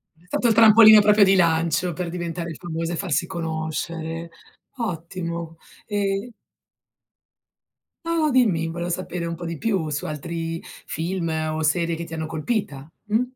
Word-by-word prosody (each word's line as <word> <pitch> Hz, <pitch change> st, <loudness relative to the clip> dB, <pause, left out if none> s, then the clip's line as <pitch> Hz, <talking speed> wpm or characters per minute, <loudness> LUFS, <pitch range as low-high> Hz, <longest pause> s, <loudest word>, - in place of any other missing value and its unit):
È 165 Hz, +3 st, -26 dB
stato 240 Hz, -, 0 dB
il 225 Hz, -, +4 dB
trampolino 220 Hz, -1 st, +8 dB
proprio 210 Hz, 0 st, +5 dB
di 195 Hz, 0 st, +5 dB
lancio 170 Hz, 0 st, +2 dB
per 175 Hz, +1 st, -4 dB
diventare 170 Hz, -1 st, -4 dB
il -, -, -8 dB
famoso 165 Hz, -1 st, -4 dB
e -, -, -2 dB
farsi 175 Hz, -2 st, 0 dB
conoscere. 165 Hz, 0 st, -4 dB, 0.5 s
Ottimo, 170 Hz, -5 st, -4 dB, 0.3 s
ehm 205 Hz, +2 st, -1 dB, 1.7 s
No, 335 Hz, 0 st, 0 dB
no 310 Hz, -2 st, +2 dB
dimmi 195 Hz, -11 st, +3 dB
volevo 170 Hz, +1 st, -4 dB
sapere 175 Hz, -1 st, -3 dB
un 170 Hz, 0 st, -3 dB
po' 170 Hz, +1 st, -8 dB
di 165 Hz, -1 st, -4 dB
più 195 Hz, -7 st, -1 dB
su 150 Hz, 0 st, -3 dB
altri 165 Hz, +2 st, -4 dB, 0.2 s
film 170 Hz, +1 st, -3 dB, 0.2 s
o 155 Hz, 0 st, -2 dB
serie 165 Hz, +2 st, +1 dB
che 170 Hz, -, -5 dB
ti 165 Hz, 0 st, -9 dB
hanno 160 Hz, 0 st, -3 dB
colpita 155 Hz, -, -3 dB, 0.2 s
mh? 215 Hz, +3 st, +1 dB
170 Hz, 155 wpm, -23 LUFS, 165-195 Hz, 1.7 s, trampolino